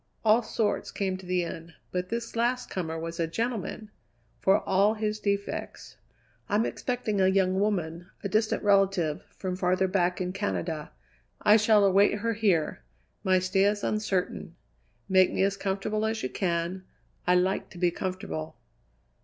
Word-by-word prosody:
All 220 +2 +6
sorts 220 -2 -1
came 190 -2 -2
to 190 -1 -12
the 180 -1 +1
inn, 165 0 -7 0.2
but 180 0 -2
this 230 0 -4
last 245 +2 0
comer 165 -3 -3
was 165 +1 -5
a 165 - +1
gentleman, 220 +1 -3 0.5
for 195 +2 +3
all 200 +3 +3
his 215 0 -2
defects. 200 -1 -3 0.5
"I'm 210 +3 +2
expecting 235 -5 -2
a 190 - +5
young 190 0 +2
woman, 175 -4 -1
a - - 0
distant 215 +3 +1
relative, 195 -6 +2
from 185 -1 -3
farther 185 +1 +1
back 180 -1 +1
in 180 0 -2
Canada. 170 -6 -3 0.5
I 210 - +7
shall 215 -1 +5
await 200 +2 +4
her 230 +2 -1
here. 200 -8 +1 0.4
My 185 -1 +4
stay 185 +1 +2
is 205 0 +1
uncertain. 215 -4 -2 0.5
Make 185 -1 +5
me - - +1
as 195 0 +1
comfortable 200 +2 -2
as 220 0 -2
you - - -1
can; 175 0 -2 0.4
I 180 - +5
like 185 +2 +1
to 175 - -13
be 175 0 +2
comfortable." 80 - -5
190 Hz, 160 wpm, -28 LUFS, 180-210 Hz, 0.5 s, I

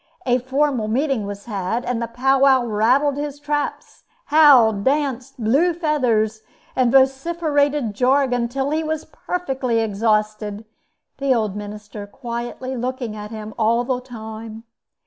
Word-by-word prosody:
A 250 -1 +2
formal 260 -2 0
meeting 250 -2 0
was 200 0 -7
had, 215 +2 -2
and 245 -1 -2
the 235 - -2
pow 265 +3 +1
wow 265 -2 +5
rattled 250 +6 +2
his 290 -1 -4
traps, 290 0 -3 0.2
howled, 255 -10 +6
danced, 270 -1 -1
blew 285 +11 +2
feathers, 240 -10 0 0.3
and 250 -2 +2
vociferated 285 -1 +2
jargon 255 +2 +2
until 265 +4 -2
he 315 +1 0
was 315 0 -3
perfectly 265 -9 -2
exhausted, 215 0 -1 0.5
the 275 -2 +2
old 215 -4 -1
minister 210 0 -8
quietly 240 +3 -5
looking 250 -2 -3
at 210 0 -7
him 215 -1 -7
all 230 +2 +2
the 250 0 -2
time. 220 -2 -9
245 Hz, 135 wpm, -21 LUFS, 220-275 Hz, 0.5 s, howled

